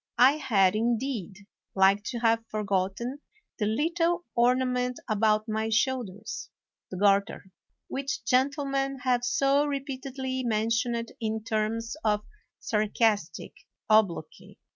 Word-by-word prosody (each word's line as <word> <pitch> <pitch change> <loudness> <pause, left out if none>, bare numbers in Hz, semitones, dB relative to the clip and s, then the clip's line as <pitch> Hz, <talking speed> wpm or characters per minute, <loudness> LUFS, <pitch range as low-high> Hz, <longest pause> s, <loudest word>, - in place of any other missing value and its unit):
I 260 +5 +6
had, 205 -9 +3
indeed, 225 -3 -2 0.3
like 195 +1 +4
to 240 - -3
have 225 -1 +2
forgotten 205 +5 -2 0.4
the 210 - +1
little 335 +8 0
ornament 250 +1 +1
about 215 0 +2
my 220 0 -1
shoulders 220 -3 -2 0.4
[the 185 - -6
garter], 200 -1 +1 0.4
which 275 -3 -4
gentle 275 +4 +2
men 275 0 -1
have 250 -2 +1
so 275 +3 +2
repeatedly 265 -2 -4
mentioned 230 +1 0
in 220 -1 -2
terms 225 +2 -2
of 210 -1 +2 0.4
sarcastic 210 -5 0 0.4
obloquy. 200 -7 +1
230 Hz, 110 wpm, -27 LUFS, 215-260 Hz, 0.4 s, I